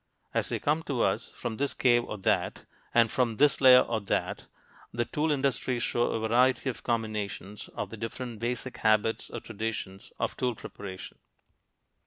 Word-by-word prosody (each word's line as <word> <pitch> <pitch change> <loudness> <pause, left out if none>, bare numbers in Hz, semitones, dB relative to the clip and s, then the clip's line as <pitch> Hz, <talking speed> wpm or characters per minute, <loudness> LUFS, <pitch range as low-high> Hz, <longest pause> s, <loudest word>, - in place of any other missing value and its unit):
As - - 0
they - - 0
come 150 +2 +1
to 130 -4 +1
us, - - 0
from 110 - -4
this 140 +1 -1
cave 120 -2 +4
or 105 - -5
that, 95 - 0 0.3
and 115 -1 +4
from 120 -3 +1
this 145 -1 +4
layer 130 -1 +9
or 115 -2 -1
that, 100 - -2 0.4
the 120 0 -1
tool 155 +5 0
industries 130 -3 0
show 120 0 +1
a 110 0 -1
variety 130 +3 +3
of - - -12
combinations 105 -3 -3
of - - -4
the 115 - -7
different 115 +1 -5
basic 120 +2 -3
habits 110 +1 +2
or - - -6
traditions 110 -3 -5
of - - -2
tool 125 -2 -1
preparation. 95 -3 -9
120 Hz, 170 wpm, -29 LUFS, 110-130 Hz, 0.4 s, layer